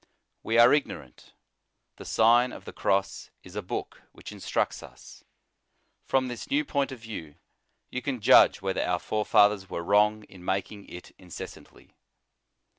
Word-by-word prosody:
We 115 - -1
are 120 +1 +7
ignorant; 145 - -4 0.6
the - - -11
Sign 120 +3 +4
of - - -11
the - - -9
Cross 100 -1 -1
is 90 +1 -14
a 105 - -2
book 90 - -6
which - - -11
instructs - - -2
us. - - -14 0.8
From 130 -1 +1
this 120 -2 -7
new 295 +2 +1
point 140 - -1
of 130 - -7
view, 105 -10 -9 0.6
you 125 - -3
can 135 -3 -3
judge 100 - +5
whether 95 -1 -1
our 90 - 0
forefathers 105 -1 +2
were 85 - -4
wrong 105 +3 +2
in 95 -3 -15
making 100 +2 -3
it 90 - -11
inces 90 -3 -8
santly. - - -19
105 Hz, 155 wpm, -27 LUFS, 95-120 Hz, 0.8 s, are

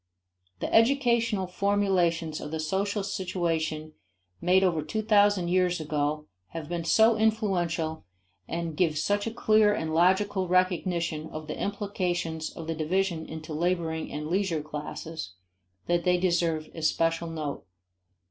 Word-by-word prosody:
The - - -3
educational 230 -4 +3
formulations 180 -4 +1
of 150 - -6
the 160 +1 -4
social 195 +5 -1
situation 165 -5 -2 0.5
made 185 +2 +4
over 170 -4 +2
two 215 +7 -3
thousand 205 -4 +4
years 180 -1 +2
ago 150 0 -1 0.3
have 165 -2 -5
been 170 0 -3
so 220 +6 +5
influential 180 -8 0 0.4
and 170 -1 -3
give 160 -2 +1
such 205 +6 0
a - - -2
clear 215 -2 +4
and 160 -4 -3
logical 190 +3 +2
recognition 175 -3 0
of 155 0 -7
the 150 - -5
implications 180 -6 -2
of 165 - -9
the 165 - -2
division 165 +1 -1
into 160 0 -7
laboring 165 -1 -1
and 150 +1 -4
leisure 175 -3 0
classes, 150 - -6 0.5
that 175 0 +1
they 180 0 +3
deserve 170 -3 0
especial 165 +1 0
note. 155 -3 -4
175 Hz, 135 wpm, -27 LUFS, 160-195 Hz, 0.5 s, so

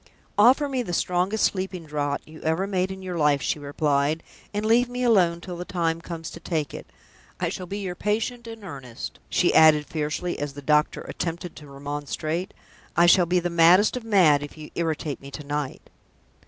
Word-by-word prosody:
"Offer 260 +7 +6
me 265 -2 -1
the 180 -7 -4
strongest 180 +5 +1
sleeping 185 -3 -1
draught 145 -1 -2
you 155 0 -12
ever 160 +4 0
made 190 -2 0
in 190 0 -7
your 180 -2 -4
life," 150 -2 +4
she 155 +4 -1
replied. 145 +1 0 0.3
"And 210 +1 -2
leave 240 +2 +4
me 250 0 -3
alone 180 -8 +3
till 175 -1 -7
the 175 - -4
time 165 -2 -1
comes 165 -1 -6
to - - -9
take 160 -3 -2
it. - - -8 0.5
I - - 0
shall 185 - -6
be 200 - -4
your 190 -3 -3
patient 225 +5 -2
in 225 -2 -9
earnest!" 135 -10 -8
she - - +2
added, 155 -1 +6
fiercely, 155 +3 -3
as 145 -1 -3
the 145 - -8
doctor 150 +2 +2
attempted 170 0 -5
to 150 - -11
remonstrate. 145 +5 -4 0.5
"I 170 - +6
shall 175 0 +6
be 180 +1 +3
the 175 0 -2
maddest 175 +6 +5
of 250 - -3
the 225 - -12
mad 165 -9 +5
if 145 +2 -8
you 155 -1 -10
irritate 160 -3 -2
me 140 - -9
to 150 - -8
night!" 145 -1 -4
170 Hz, 200 wpm, -25 LUFS, 150-190 Hz, 0.5 s, Offer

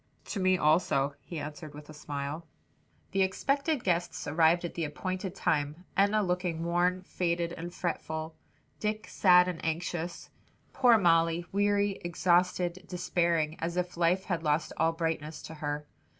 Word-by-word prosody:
"To 200 - -2
me 185 0 +3
also," 150 -3 +2
he 170 - -8
answered 150 0 -7
with 150 0 -11
a 155 - -10
smile. 150 +2 -5 0.6
The 195 - +1
expected 275 - 0
guests 175 -1 -1
arrived 165 +3 +3
at 170 - -5
the 170 - -3
appointed 185 +5 -4
time, 150 +3 -1
Enna 205 +2 +3
looking 180 -3 -1
worn, 175 +2 +1
faded 170 -2 -1
and 175 +1 -6
fretful, 160 -2 -3 0.5
Dick 215 +1 -2
sad 180 -2 +5
and 175 -3 -4
anxious, 170 +1 -3 0.4
poor 245 -3 +6
Molly, 165 -2 +3
weary, 205 0 +1
exhausted, 175 +1 +1
despairing; 170 -3 0
as 170 +2 -3
if 180 0 -2
life 175 +2 +2
had 175 -4 -1
lost 155 0 0
all 165 0 +3
brightness 160 -2 -3
to - - -8
her. 150 -1 -4
175 Hz, 150 wpm, -30 LUFS, 160-185 Hz, 0.6 s, poor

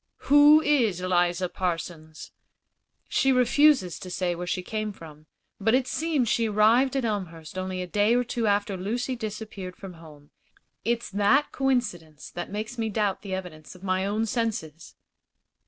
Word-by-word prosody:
"Who 295 +2 +8
is 240 - +2
Eliza 180 0 +1
Parsons?" 165 -3 -5 0.8
"She 270 - +2
refuses 255 - +3
to 185 - -8
say 180 -1 -1
where 175 +1 -6
she 185 +1 -2
came 215 +2 -3
from. 155 -5 -13 0.3
But 225 +4 +3
it 260 0 +1
seems 310 -6 0
she 225 0 +1
arrived 230 +6 +3
at 265 -3 0
Elmhurst 175 -8 -4
only 185 0 -3
a - - -4
day 205 +5 +2
or 245 - +2
two 235 -2 -2
after 200 -1 +1
Lucy 235 +8 -2
disappeared 215 -5 -6
from 195 -2 -10
home. 150 -3 -15 0.5
It's 235 -1 -1
that 205 +9 +2
coincidence 210 - -2
that 175 - -6
makes 215 +4 -5
me 225 -1 -1
doubt 205 -2 -1
the 195 -2 -4
evidence 175 -4 -8
of 180 - -16
my 185 0 0
own 215 +2 0
senses." 205 -9 -3
205 Hz, 160 wpm, -26 LUFS, 180-235 Hz, 0.8 s, Who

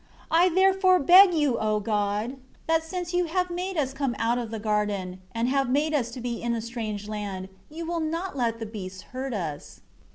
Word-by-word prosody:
6 - - -27
I 345 +3 +5
therefore 375 +1 +4
beg 360 +5 +8
you, 290 -6 +2
O 215 -1 +1
God, 210 +4 -1 0.3
that 325 0 +2
since 355 +1 -5
You 355 0 +2
have 360 +2 -1
made 365 +1 -3
us 270 -3 0
come 275 -3 -1
out 235 +2 +1
of 235 -2 -4
the 225 - -4
garden, 205 -4 -1
and 230 +3 -1
have 270 -1 +1
made 295 +4 +1
us 240 -4 -1
be 240 -1 -4
in 235 0 0
a - - -2
strange 220 -3 -5
land, 200 -3 -5 0.2
You 325 +2 -6
will 340 0 -2
not 330 +2 -3
let 235 -3 0
the 225 - -5
beasts 190 -4 -7
hurt 260 -1 -3
us." 155 -7 -5
245 Hz, 205 wpm, -26 LUFS, 215-325 Hz, 0.3 s, beg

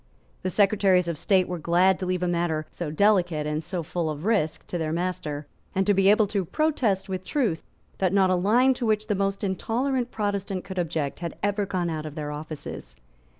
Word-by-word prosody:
The 185 - -1
Secretaries 195 -2 +3
of 170 - -1
State 185 +3 +2
were 180 -1 -4
glad 175 +3 +3
to 185 - -3
leave 180 0 -1
a - - +1
matter 170 -3 0
so 170 -3 -4
delicate 175 -3 +2
and 150 +1 -2
so 175 +1 -4
full 165 0 -2
of 155 +2 -5
risk 170 -8 0
to 175 - -4
their 155 -1 -1
master, 160 -4 -3 0.3
and 190 0 +2
to 205 - +4
be 195 0 +4
able 215 +1 +5
to 200 -1 -1
protest 230 - 0
with 185 -1 -4
truth 220 - 0 0.4
that 185 -2 +2
not 190 -1 +4
a - - +4
line 235 +9 +4
to 245 -1 -3
which 215 0 +1
the 215 - 0
most 195 0 -1
intolerant 240 +6 -1
Protestant 200 -4 -2
could 190 -1 -5
object 160 -4 -2
had 170 -2 -5
ever 205 0 0
gone 180 -3 -1
out 155 -1 -4
of 150 - -9
their 150 -1 -4
offices. 150 - -7
185 Hz, 210 wpm, -26 LUFS, 165-205 Hz, 0.4 s, able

